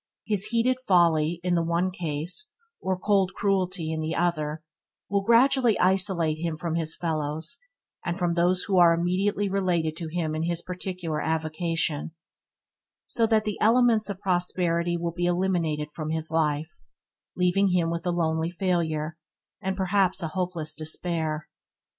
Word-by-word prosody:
His 205 -3 +1
heated 245 +2 +1
folly 170 -7 +3
in 180 -1 +1
the 170 - +3
one 170 +3 0
case, 170 - -3 0.3
or 190 -1 -1
cold 195 -1 +1
cruelty 185 -4 0
in 160 0 -2
the 160 +1 -2
other, 155 -3 -1 0.5
will 200 0 +2
gradually 240 +1 +4
isolate 180 -4 +2
him 165 -1 -2
from 165 0 -3
his 165 -1 -2
fellows 160 - -3 0.5
and 175 0 -2
from 175 -2 0
those 175 +2 +2
who 190 -3 +2
are 170 -1 +7
immediately 190 +4 0
related 180 -5 0
to 170 - -4
him 160 -1 -2
in 155 - -2
his 170 +1 -1
particular 180 -4 -4
avocation, 160 -1 -1 0.9
so 230 -1 +1
that 220 -1 +3
the 210 -2 -3
elements 225 -1 +4
of 195 -2 -4
prosperity 175 -2 0
will 170 0 -2
be 175 0 -1
eliminated 170 -5 0
from 155 -1 -4
his 160 0 -2
life, 155 0 -1 0.5
leaving 180 +2 +3
him 175 -3 +1
with 170 0 -3
a - - +2
lonely 160 -1 0
failure, 165 -3 -1 0.4
and 190 -1 -2
perhaps 190 -1 +1
a 165 - -2
hopeless 170 -2 -3
despair. 155 -1 -3
175 Hz, 155 wpm, -26 LUFS, 160-190 Hz, 0.9 s, are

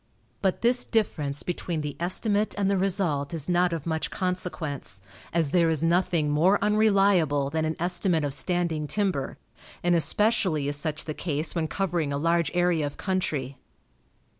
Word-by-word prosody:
But 190 +2 0
this 245 +1 +4
difference 150 -10 -1
between 175 -2 -3
the 150 -1 -5
estimate 205 +4 +1
and 200 -1 +1
the 200 - +2
result 175 -7 0
is 155 -3 -3
not 175 0 +2
of 165 -3 -4
much 160 -1 -2
consequence, 175 - -3 0.3
as 160 -4 +1
there 170 -2 +3
is 160 -1 0
nothing 170 -3 +1
more 175 +7 +4
unreliable 195 -9 +2
than 160 0 0
an 155 0 -2
estimate 175 -1 +1
of 145 -2 -1
standing 170 -1 -1
timber, 185 -8 -1 0.5
and 175 0 +3
especially 175 -4 +1
is 145 - 0
such 155 +1 -3
the 155 - -4
case 155 -1 -2
when 165 -2 -1
covering 170 -5 -1
a 140 - -1
large 170 +2 +1
area 175 -4 +2
of 145 - -9
country. 145 -9 -2
170 Hz, 165 wpm, -26 LUFS, 150-185 Hz, 0.5 s, this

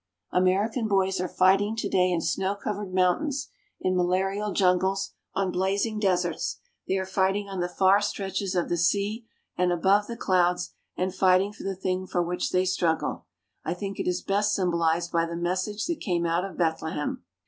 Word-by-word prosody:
American 200 +6 +2
boys 190 -2 +1
are 185 - -1
fighting 195 +4 +3
today 185 -4 +1
in 175 -2 0
snow 190 +4 0
covered 205 -1 -4
mountains, 260 - +1 0.3
in 185 0 0
malarial 190 +3 0
jungles, 190 +1 +2 0.2
on 195 -1 0
blazing 200 +4 0
deserts; 180 -5 0 0.3
they 190 - +1
are 190 - -2
fighting 190 +1 0
on 195 -2 -5
the 175 0 -1
far 190 +2 +4
stretches 195 -2 -2
of 175 - +1
the 175 - -1
sea 205 +6 0 0.3
and 180 0 +2
above 195 +4 +3
the 235 - -6
clouds, 180 -3 +1 0.3
and 185 0 -1
fighting 190 +1 +3
for - - -12
the 195 0 -3
thing 185 0 -2
for 175 -1 0
which 175 +1 -2
they 185 0 +2
struggle. 175 -3 -1 0.4
I 165 - -2
think 195 +1 -5
it - - -2
is 180 0 -1
best 205 +1 +1
symbolized 170 -2 +1
by 165 -1 +1
the 170 - -5
message 185 +5 -1
that 340 -2 -2
came 175 - -1
out 170 +2 +1
of 190 -5 -8
Bethlehem. 160 - -1
185 Hz, 180 wpm, -26 LUFS, 180-200 Hz, 0.4 s, far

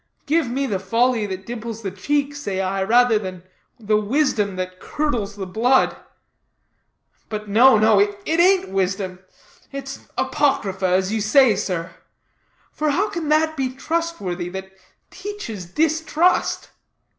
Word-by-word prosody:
Give 310 -3 +1
me 270 +3 -1
the 200 -7 -1
folly 230 +3 +1
that 190 -1 -6
dimples 230 -1 -6
the 195 - -3
cheek, 285 +9 -1
say 200 -10 -3
I, 190 0 -1
rather 235 +2 +4
than 185 -3 -7 0.4
the 215 -1 +1
wisdom 210 -4 0
that 185 0 -5
curdles 235 -9 -2
the 195 -2 -5
blood. 235 +8 +2 1.3
But 215 -1 -5
no, 230 +4 +6
no; 215 -1 +4
it 205 0 +2 0.2
ain't 370 - +4
wisdom; 190 -1 -2 0.5
it's 275 -1 -7
apocrypha, 200 -10 0
as 185 +3 +1
you 220 - 0
say, 230 +1 +5
sir. 185 -3 -3 0.8
For 305 0 -1
how 385 +9 +1
can 330 -3 -3
that 315 +1 +2
be 265 -3 -1
trustworthy 270 - -3
that 190 +1 -7 0.4
teaches 375 - -7
distrust?" 320 - +1
220 Hz, 135 wpm, -21 LUFS, 190-285 Hz, 1.3 s, no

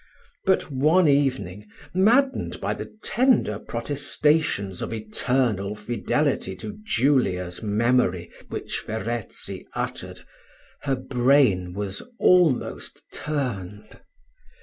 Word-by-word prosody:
But 190 -5 +2
one 155 +6 +4
evening, 125 -9 +1 0.3
maddened 240 +9 +2
by - - -1
the - - -7
tender 235 - +2
protestations 140 - 0
of - - -4
eternal 110 -2 0
fidelity 120 +7 -1
to 210 0 -8
Julia's 120 - +1
memory 105 -5 +1 0.2
which - - -4
Verezzi 110 +1 -4
uttered, - - -4 0.6
her 135 -1 +1
brain 125 -8 +2
was 100 -1 -3 0.2
almost 175 -8 +2
turned. 110 -8 -4
125 Hz, 90 wpm, -24 LUFS, 105-145 Hz, 0.6 s, one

